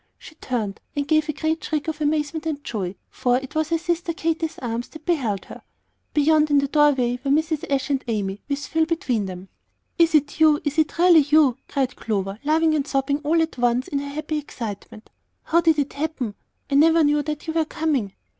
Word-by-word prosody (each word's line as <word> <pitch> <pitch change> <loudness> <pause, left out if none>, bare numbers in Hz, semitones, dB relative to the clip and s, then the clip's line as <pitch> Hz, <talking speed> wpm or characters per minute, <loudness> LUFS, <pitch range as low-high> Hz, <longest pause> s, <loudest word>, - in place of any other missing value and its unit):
She - - -13
turned, 230 -9 -4
and 285 -1 -1
gave 310 0 +2
a - - 0
great 315 +3 -2
shriek 305 0 -2
of 315 -1 -4
amazement 305 +1 -1
and 290 -2 -3
joy, 195 -4 -4 0.2
for 245 0 +1
it 265 0 -7
was 315 0 0
her 335 - +2
sister 340 +1 -2
Katy's 325 0 -2
arms 235 -1 -4
that 315 +1 -13
held 245 - 0
her. - - -11 0.5
Beyond, 305 +1 +4
in 290 - +4
the 280 0 +2
doorway, 270 -5 +2
were 275 - -2
Mrs. 310 +1 +1
Ashe 275 +1 0
and 270 -1 0
Amy, 205 -3 -2
with 280 0 -2
Phil 320 0 +1
between 250 - -1
them. 185 0 -8 0.5
"Is 330 -1 +4
it 295 +1 +1
you; 310 -2 +5
is 295 +1 -1
it 310 0 +1
really 345 -1 +7
you?" 295 -3 +4
cried 265 -3 -1
Clover, 200 -2 -3
laughing 315 +2 +3
and 295 -2 0
sobbing 275 +1 0
all 305 +3 +1
at 320 -5 -6
once 245 +1 +1
in 280 - -1
her 285 0 -5
happy 305 +1 -3
excitement. 220 -6 -8 0.3
"How 335 +1 +2
did 320 -2 +3
it 290 -1 -1
happen? 285 -7 -3 0.3
I - - -5
never 320 +3 +5
knew 295 0 +3
that 300 0 -5
you 320 - -3
were 325 -1 +1
coming." 295 - -1
295 Hz, 210 wpm, -23 LUFS, 255-315 Hz, 0.5 s, really